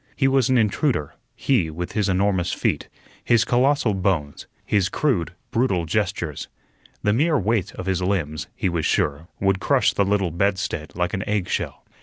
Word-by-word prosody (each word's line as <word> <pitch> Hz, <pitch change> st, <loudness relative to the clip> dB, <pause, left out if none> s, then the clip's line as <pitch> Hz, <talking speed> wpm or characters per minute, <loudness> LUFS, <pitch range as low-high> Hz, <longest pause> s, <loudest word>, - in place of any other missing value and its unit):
He 135 Hz, -, +2 dB
was 135 Hz, -2 st, +3 dB
an 130 Hz, -, +4 dB
intruder; 110 Hz, -, +1 dB, 0.2 s
he, 110 Hz, -13 st, +1 dB
with 85 Hz, +3 st, -5 dB
his 105 Hz, -3 st, 0 dB
enormous 95 Hz, -1 st, +1 dB
feet, -, -, -1 dB, 0.3 s
his 120 Hz, -2 st, +3 dB
colossal 125 Hz, -1 st, +2 dB
bones, 90 Hz, -7 st, -1 dB, 0.2 s
his 95 Hz, -2 st, +1 dB
crude, 100 Hz, -, 0 dB, 0.2 s
brutal 115 Hz, -9 st, +1 dB
gestures. 85 Hz, -4 st, -2 dB, 0.6 s
The 105 Hz, -, +3 dB
mere 150 Hz, +6 st, +3 dB
weight 105 Hz, -2 st, 0 dB
of 95 Hz, -, -6 dB
his 95 Hz, -2 st, 0 dB
limbs, 85 Hz, -6 st, -1 dB
he -, -, -1 dB
was 85 Hz, -3 st, -1 dB
sure, 75 Hz, +3 st, 0 dB
would 95 Hz, -1 st, +2 dB
crush -, -, +2 dB
the 100 Hz, -, +2 dB
little 100 Hz, -3 st, +1 dB
bed 100 Hz, +4 st, +1 dB
stead 75 Hz, -4 st, -4 dB
like 90 Hz, 0 st, -1 dB
an 95 Hz, -, -1 dB
eggshell. 105 Hz, -4 st, -2 dB
95 Hz, 170 wpm, -23 LUFS, 85-115 Hz, 0.6 s, an